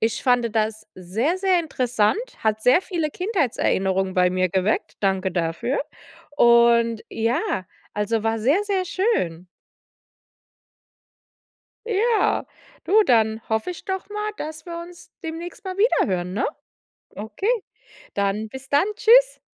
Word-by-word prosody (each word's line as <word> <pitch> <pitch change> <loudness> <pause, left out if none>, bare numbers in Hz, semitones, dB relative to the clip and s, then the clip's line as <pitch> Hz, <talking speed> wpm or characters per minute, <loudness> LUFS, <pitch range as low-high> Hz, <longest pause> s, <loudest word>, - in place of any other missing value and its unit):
ich 225 +1 0
fand 245 -3 +2
das 215 0 -1
sehr, 215 - -1
sehr 375 -2 +2
interessant, 250 - 0 0.2
hat 220 0 -1
sehr 255 +8 +5
viele 335 -6 -2
Kindheitserinnerungen 195 - 0
bei 180 0 +3
mir 185 0 +1
geweckt. 190 +4 -1
Danke 190 -1 0
dafür. 175 +8 -1 0.5
Und 235 -3 +4
ja, 225 - -1 0.3
also, 210 +1 -1
war 225 0 0
sehr, 280 - +2
sehr 390 -3 0
schön. 185 - -1 2.4
Ja. 450 +1 +1 0.4
Du, 430 +3 +5
dann 220 -2 +2
hoffe 220 +9 -1
ich 350 - -9
doch 380 0 -4
mal, 420 0 -3
dass 310 0 -7
wir 335 0 -6
uns 350 0 -14
demnächst 335 +5 -7
mal 375 0 -5
wieder 445 +5 +3
hören, 180 0 -2
ne? 220 - 0 0.6
Okay, 220 - -5 0.7
dann 200 +2 -1
bis 265 +3 -10
dann, 285 +6 +3
tschüss. - - +5
235 Hz, 130 wpm, -23 LUFS, -, 2.4 s, sehr